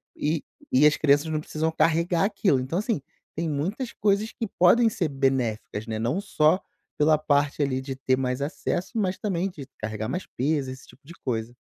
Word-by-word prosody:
e 155 +1 -1 0.3
e 135 +4 +5
as 150 - +3
crianças 145 0 +4
não 155 - 0
precisam 155 +1 -2
carregar 170 +2 +2
aquilo, 195 -8 +2
então 130 +8 -2
assim, 215 - -1 0.3
tem 165 +1 -1
muitas 190 - -2
coisas 210 +1 +1
que 225 - -4
podem 225 +7 +6
ser 195 -7 -1
benéficas 125 -6 -1
né, 110 -1 -3
não 125 - 0
só 170 -3 +3 0.4
pela 155 +1 +4
parte 145 -1 +1
ali 130 -2 0
de 135 0 -5
ter 130 -1 +1
mais 125 0 -1
acesso, 165 +5 -2
mas 190 -3 0
também 190 -2 -1
de 145 -7 -10
carregar 110 0 -3
mais 180 - -3
peso, 140 0 0
esse 130 +1 -11
tipo 135 - -18
de 165 - -11
coisa. 120 -1 -2
150 Hz, 190 wpm, -26 LUFS, 130-180 Hz, 0.4 s, podem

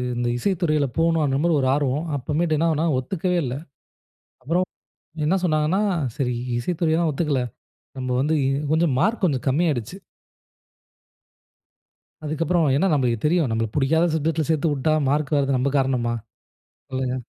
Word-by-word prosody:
இந்த 120 0 -1
இசைத்துறையில 160 -3 +1
போணும்ன்ற 160 -4 +2
மாரி 170 - +3
ஒரு 130 - +1
ஆர்வம். 145 +2 -1
அப்போமேட்டு 155 +5 0
என்னாகுனா, 160 0 +1
ஒத்துக்கவே 180 +6 -1
இல்ல. 125 0 -3 0.9
அப்புறம் 175 +6 +1 0.6
என்ன 170 +5 +2
சொன்னாங்கன்னா, 155 +4 +1 0.4
சரி 125 -3 0 0.3
இசைத்துறையை 160 +3 0
தான் 165 - +2
ஒத்துக்கல. 145 -3 0 0.6
நம்ம 130 -1 -3
வந்து 150 +4 +1 0.4
கொஞ்ச 160 +2 +3
மார்க் 215 - +1
கொஞ்ச 145 -7 +2
கம்மியாடுச்சு. 145 - 0 2.3
அதுக்கு 155 +2 -2
அப்புறம் 170 0 +2
ஏன்னா 175 +8 +2
நம்மளுக்குத் 120 -6 0
தெரியும். 160 -1 +2
நம்மளுக்கு 115 -1 -2
பிடிக்காத 160 +5 +3
சப்ஜெக்ட்ல் 160 0 0
சேர்த்து 160 0 +1
விட்டா 145 +3 +1 0.2
மார்க் 145 +1 0
வர்றாதது 140 -2 +2
நம்ம 130 +2 0
காரணமா? 130 -3 +1 0.8
சொல்லுங்க. 130 -1 -2
150 Hz, 130 wpm, -23 LUFS, 135-165 Hz, 2.3 s, மாரி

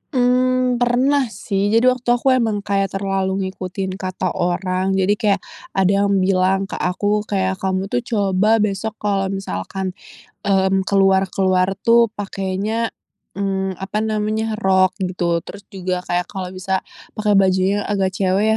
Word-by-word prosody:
Mmm, 250 0 +2
pernah 255 +3 +2
sih, 200 -3 -2
jadi 225 +3 +3
waktu 245 -1 +1
aku 260 +2 +2
emang 225 -5 +1
kayak 195 -1 -1
terlalu 195 0 -1
ngikutin 190 0 -4
kata 185 -1 -2
orang 185 +2 -1
jadi 190 +1 +2
kayak 200 -3 +1 0.3
ada 195 +1 +3
yang 200 - +2
bilang 190 0 +2
ke 195 - -6
aku 205 +4 0
kayak, 190 -1 -1
"Kamu 190 +1 -2
tuh 245 - +2
coba 210 -2 +1
besok 210 +1 -2
kalau 200 -2 -1
misalkan," 190 - -4 0.5
mmm, 190 -1 +2
"keluar-keluar 190 -1 +3 0.2
tuh 235 -1 +5
pakainya," 200 +3 -2 0.5
mmm, 190 -2 -2
apa 195 +2 -3
namanya, 215 0 -1
"rok," 190 -2 +2
gitu. 180 -3 0
Terus 200 +4 -10
juga 185 -2 -3
kayak, 180 0 -1
"Kalau 185 -2 -6
bisa 190 0 -2 0.3
pakai 210 -2 +2
bajunya 190 +1 +2
agak 195 -2 0
cewek 195 +2 +2
195 Hz, 140 wpm, -20 LUFS, 190-215 Hz, 0.5 s, tuh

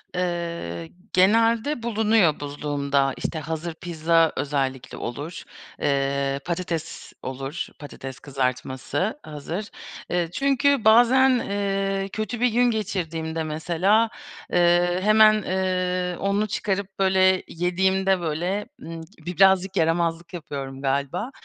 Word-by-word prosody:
Iıı, 170 - -3 0.2
genelde 230 +7 +3
bulunuyor 220 -7 +2
buzluğumda. 140 -1 -1
İşte, 160 - -3
hazır 160 +2 -4
pizza 165 -1 +1
özellikle 135 -3 -2
olur, 145 +8 -6 0.4
ııı, 140 -1 0
patates 170 -2 -4
olur, 135 +4 -4
patates 135 -2 -8
kızartması 135 - -2
hazır. 160 +7 -6 0.4
Iıı, 175 -2 0
çünkü 275 0 +2
bazen, 245 +4 +6
ııı, 195 -1 -1
kötü 215 +3 -4
bir 250 - +4
gün 245 +2 +3
geçirdiğimde 165 -7 -3
mesela, 175 +8 +1 0.4
ııı, 175 +1 +3
hemen, 215 +1 +6
ııı, 185 -1 -1
onu 200 +2 0
çıkarıp, 195 -1 -3
böyle, 190 -1 +4
yediğimde, 190 +2 +1
böyle, 175 +6 -2
ımm, 165 0 -7 0.2
bi 180 0 -5
birazcık 190 0 +4
yaramazlık 165 +1 0
yapıyorum 140 -5 -6
galiba, 140 - -1
175 Hz, 105 wpm, -24 LUFS, 155-200 Hz, 0.4 s, bazen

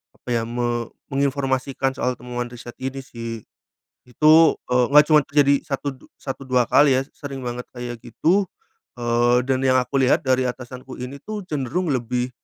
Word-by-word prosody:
apa - - -13
ya, 115 - 0
me 120 -1 -2 0.2
menginformasikan 135 -1 0
soal 125 -1 0
temuan 120 0 -5
riset 120 0 -10
ini 135 +1 -4
sih. 115 -3 -7 0.6
Itu, 155 +5 +5
eee, 125 0 +3
enggak 150 +1 +8
cuman 150 -2 +6
terjadi 140 -1 +4
satu, 140 0 -3
du 130 - -18
satu 135 0 -6
2 125 -1 +3
kali 145 -3 +5
ya, - - +2
sering 140 -2 -7
banget 120 0 -4
kayak 120 -1 -6
gitu, 180 - +1 0.5
eee, 120 +1 +2
dan 130 -1 +2
yang 130 0 +4
aku 130 +3 -2
lihat 130 - +3
dari 130 0 +2
atasanku 125 +1 -7
ini 130 +3 -6
tuh 215 -1 -5
cenderung 150 +5 -2
lebih, 125 -1 -1
130 Hz, 170 wpm, -22 LUFS, 120-140 Hz, 0.6 s, enggak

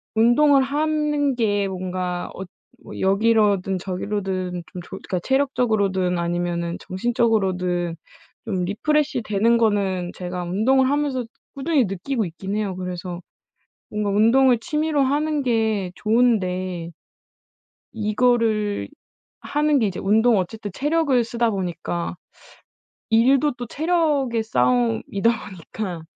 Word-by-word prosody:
운동을 270 +5 +5
하는 295 -1 0
게 205 -4 +1
뭔가 180 -1 -3
엇 190 -1 -7 0.4
뭐 - - -9
여기로든 200 -2 +2
저기로든 185 -1 -3
좀 180 -3 -7
조 - - -16
그러니까 180 - -4
체력적으로든 215 -9 +1
아니면은 170 0 -2
정신적으로든 185 -5 0 0.5
좀 190 -5 -1
리프레시 285 +5 0
되는 215 +3 +2
거는 195 -5 0
제가 180 0 -5
운동을 250 +9 +2
하면서 280 -3 0 0.3
꾸준히 275 -3 +1
느끼고 215 +6 -2
있긴 190 +4 -5
해요. 205 -3 -2
그래서 180 -1 -5 0.7
뭔가 210 -1 -2
운동을 235 +5 +4
취미로 305 0 0
하는 295 +2 0
게 220 -6 0
좋은데 185 -7 0 1.1
이거를 215 -1 +1 0.5
하는 295 0 +1
게 225 - +2
이제 190 - -4
운동 220 +3 +3
어쨌든 205 +3 -4
체력을 290 -4 +2
쓰다 235 0 0
보니까 175 -3 -3 0.9
일도 265 +6 +4
또 245 -1 -6
체력의 295 -7 0
싸움이다 125 - +1 0.2
보니까 180 0 -6
215 Hz, 270 characters per minute, -22 LUFS, 185-255 Hz, 1.1 s, 운동을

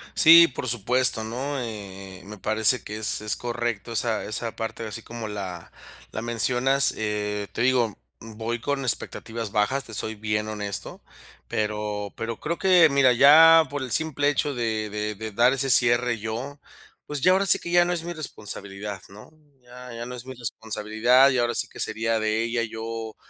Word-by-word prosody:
Sí, 165 +1 +8
por 130 0 -6
supuesto, 120 0 +1
¿no? 130 +5 -4
Eh, 100 -5 -8
eh, - - -18
me 105 +1 -10
parece 110 +5 +2
que 105 +1 -7
es 110 -1 +2
es 105 - 0
correcto, 120 -2 -4
esa 115 -1 -1
esa 115 +1 -4
parte, 115 0 -5
así 110 +2 -8
como 115 -1 -7
la 95 -5 -7 0.4
la 110 - -5
mencionas. 125 +4 +3
Eh, 105 -1 -3
te - - -3
digo, 125 -4 +1 0.2
voy 115 +1 -5
con 140 +3 -2
expectativas 115 -3 -3
bajas, 115 +6 0
te 115 - -12
soy 110 +1 -4
bien 105 0 -2
honesto. 105 -2 -5 0.4
Pero 105 -1 -3
pero 115 -1 -5
creo 170 +2 -3
que 180 -4 +5
Mira, 140 -3 +4
ya 160 +5 +7
por 145 -1 -4
el 125 - -7
simple 145 +2 +2
hecho 145 -1 -1
de 110 -3 -2
de 105 +1 -4
de 110 +2 -7
dar 120 +5 +3
ese 135 0 -1
cierre 120 -1 +3
yo, 120 +7 -6 0.5
pues, 145 -2 -5
ya 185 - +5
ahora 195 +1 +1
sí, - - +6
que - - -8
ya 175 0 +5
no 175 - -1
es 170 -2 -3
mi 175 +1 -5
responsabilidad, 105 - -6
¿no? 105 +8 -14 0.3
Ya 125 0 -12
ya 115 0 -6
no 125 - -7
es 125 0 -10
mi 130 - -8
responsabilidad. 115 +2 +1
Ya 130 -3 +1
ahora 120 0 0
sí, - - 0
que - - -14
sería 115 0 -1
de 110 +1 0
ella. 115 0 -1
Yo 110 0 -6
115 Hz, 190 wpm, -24 LUFS, 105-130 Hz, 0.5 s, Sí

